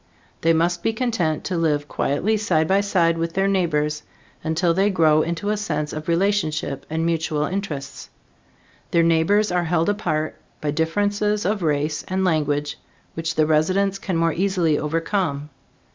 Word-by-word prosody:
They 165 - +3
must 170 +2 +1
be 225 - 0
content 220 -10 -1
to 185 - -2
live 150 -3 0
quietly 170 +13 0
side 175 -7 +1
by 195 +2 +3
side 170 -5 +1
with 165 0 -2
their 195 +1 +2
neighbors, 150 -6 0 0.4
until 165 +2 +1
they 195 +4 +2
grow 155 -5 +4
into 170 +6 -2
a 210 - 0
sense 150 -7 -3
of 155 +1 -6
relationship 165 -6 0
and 160 +1 -1
mutual 160 -2 0
interests. 165 -7 -5 0.8
Their 170 - +3
neighbors 170 +6 +3
are 175 -1 +1
held 165 +2 +1
apart 155 -7 -2 0.2
by 150 - -1
differences 205 +6 0
of 205 +1 0
race 150 -1 0
and 190 0 0
language 150 -3 0 0.3
which 165 0 -3
the 155 - +3
residents 185 +6 +1
can 185 -4 -2
more 165 -1 +2
easily 180 -4 +1
overcome. 155 -2 -2
165 Hz, 160 wpm, -22 LUFS, 155-195 Hz, 0.8 s, grow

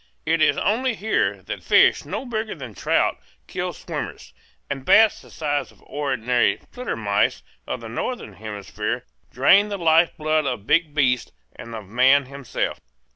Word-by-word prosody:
It 160 +1 +1
is 155 - +4
only 240 +4 +1
here 220 +2 0
that - - -6
fish - - +4
no - - -4
bigger 220 -3 -3
than 130 -7 -9
trout - - +1 0.3
kill - - -3
swimmers, 60 -1 -7 0.3
and 135 -1 -4
bats 220 +9 +5
the - - -17
size 145 -2 -2
of - - -23
the - - -25
ordinary 125 -4 0 0.2
"flittermice" 115 - -1 0.2
of 125 - -4
the 115 - -7
northern 120 - -4
hemisphere 105 0 -5 0.3
drain 195 +11 +5
the 200 - -3
life 165 -1 +3
blood 155 -1 +1
of 115 -6 -3
big 155 0 +2
beasts 125 -4 +1 0.2
and 115 -1 -9
of 110 -2 -7
man 130 +7 +4
himself. 140 -1 -4
140 Hz, 160 wpm, -23 LUFS, 120-170 Hz, 0.3 s, bats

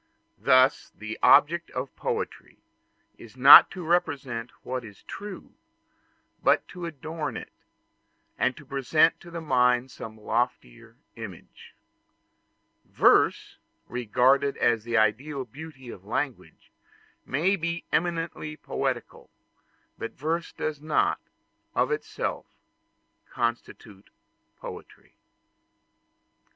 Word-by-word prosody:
Thus 130 +1 +3
the 110 +2 -7
object 170 +3 +5
of 130 +1 -5
poetry - - -4 0.6
is 115 +2 -14
not 135 +3 +10
to 180 -3 -8
represent 135 -8 -1
what 130 0 -4
is 105 -3 -13
true, 205 -2 -9 0.9
but - - +3
to 175 -2 -6
adorn 155 0 -5
it, - - -9 0.8
and 130 - 0
to 155 - -13
present 140 +4 +2
to 175 - -13
the 170 0 -6
mind 125 -3 +2
some 110 -2 -9
loftier 110 - -3 0.2
imagery. - - -11 1.1
Verse, - - +2 0.3
regarded 125 +4 +2
as 115 -2 +2
the 120 0 0
ideal 130 +6 0
beauty 135 0 -11
of 95 - -12
language, 125 +5 -5 0.5
may 170 +9 +1
be 170 -1 -4
eminently 165 -2 -2
poetical; - - -4 0.7
but 115 - -5
verse 165 +4 -3
does 150 -2 -4
not, 155 +1 +1 0.6
of - - +1
itself, 450 - -3 0.8
constitute 115 -4 -4 0.5
poetry. - - -11
135 Hz, 100 wpm, -26 LUFS, 120-160 Hz, 1.1 s, not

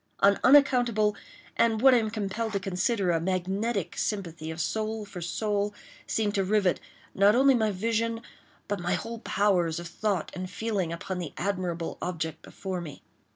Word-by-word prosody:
An 200 0 +5
unaccountable, 245 -6 +5 0.4
and 225 -2 +3
what 265 +2 +7
I 245 - +6
am 220 -1 -1
compelled 215 +1 -3
to 200 - +1
consider 190 0 0
a 165 - +2
magnetic, 190 +3 -1
sympathy 170 -6 -3
of 160 +1 -6
soul 215 +4 -2
for 195 -3 -8
soul, 205 +3 -1 0.3
seemed 210 -2 0
to 195 - +1
rivet, 195 -2 +2 0.3
not 200 +3 +5
only 270 +2 +6
my 220 -3 +2
vision, 225 +3 -1 0.4
but 205 0 -2
my 175 0 0
whole 230 0 -5
powers 185 -7 +1
of 175 - -6
thought 195 0 -2
and 185 0 -5
feeling, 200 -4 -2
upon 180 +2 -4
the 170 -4 -5
admirable 180 -3 -2
object 165 -2 -3
before 190 -2 -5
me. 150 -4 -9
200 Hz, 165 wpm, -28 LUFS, 180-220 Hz, 0.4 s, what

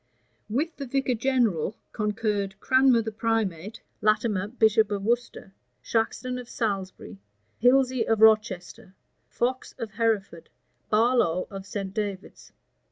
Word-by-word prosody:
With 300 +9 -2
the 275 - -6
vicar 270 0 0
general 230 - 0
concurred 210 -2 -2
Cranmer 260 -2 +4
the 220 - -4
primate, 215 -3 -2 0.2
Latimer, 215 -2 +1
bishop 220 -2 +3
of 200 -2 -3
Worcester, 235 -3 -2 0.3
Shaxton 250 +2 -1
of 245 - -14
Salisbury, 190 - -4 0.4
Hilsey 255 -1 +3
of 225 -1 +2
Rochester, 215 -4 +2 0.3
Fox 255 +2 -2
of 230 -4 -5
Hereford, 215 -7 -1 0.4
Barlow 215 -6 +2
of 195 0 -8
St. 195 -2 -5
David's. 205 -2 -5
220 Hz, 115 wpm, -26 LUFS, 200-240 Hz, 0.4 s, Cranmer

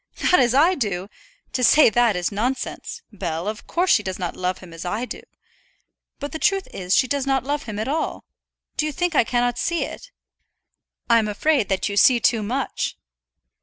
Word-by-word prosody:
"Not 360 - +5
as 245 -1 +3
I 325 +7 +5
do! 200 - -3 0.4
To 255 - -1
say 295 -1 +6
that 235 -2 +3
is 180 +2 -1
nonsense, 255 - -3
Bell; 175 -3 -4
of 215 0 -5
course 360 +2 +1
she 210 - +5
does 190 -2 -5
not 180 -2 -4
love 185 0 -2
him 180 -3 -13
as 165 - -8
I 210 +7 -2
do. - - -8 1.0
But 285 0 -6
the 320 - -5
truth 390 0 +1
is 180 0 0
she 260 - +3
does 275 0 -1
not 270 -2 +1
love 285 +2 -2
him 215 -3 -6
at 220 - -2
all. 310 +3 -2 0.5
Do 310 - +1
you - - -2
think 355 +2 -1
I 290 - +4
cannot 245 +1 0
see 340 -1 0
it?" - - -8 1.0
"I'm 230 -2 +4
afraid 230 +1 +1
that 190 -1 0
you 200 -1 -4
see 245 +3 +6
too 230 -1 +2
much." 255 +6 -3
240 Hz, 200 wpm, -22 LUFS, 200-285 Hz, 1.0 s, say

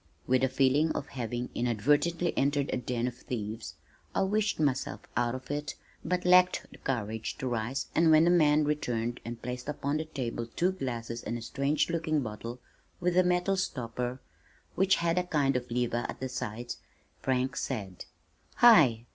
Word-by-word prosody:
With 130 +1 +2
a 130 - +3
feeling 140 +4 +3
of 140 - -4
having 120 -1 -4
inadvertently 145 - +1
entered 140 0 +1
a - - +1
den 125 -1 -2
of 125 - -3
thieves, 110 -2 -5 0.4
I - - +3
wished 210 0 0
myself 140 -4 0
out 120 0 +1
of 130 +2 -7
it 145 0 -3 0.3
but 180 0 -1
lacked 180 0 +5
the - - -14
courage 110 -4 -3
to 130 - -3
rise 120 +3 -2
and 165 0 +4
when 155 0 +7
the 175 - +4
man 155 -3 +4
returned 120 -5 -1
and 115 0 -6
placed 125 +3 -5
upon 145 0 -1
the 160 - -3
table 120 -6 -4
two 180 +2 +2
glasses 120 -9 -4
and 120 - -3
a - - -8
strange 140 +7 0
looking 160 -3 0
bottle 115 +3 -6 0.4
with 180 0 0
a 185 - +6
metal 180 +2 +2
stopper 125 -6 -3 0.5
which 190 +1 +3
had 170 +1 +1
a - - 0
kind 145 -6 +1
of 125 0 -2
lever 120 0 0
at - - -6
the 130 - -3
side, 120 -1 -4 0.5
Frank 130 0 0
said, 100 -8 -4 0.5
"Hi! 140 - +6
130 Hz, 175 wpm, -30 LUFS, 120-160 Hz, 0.5 s, when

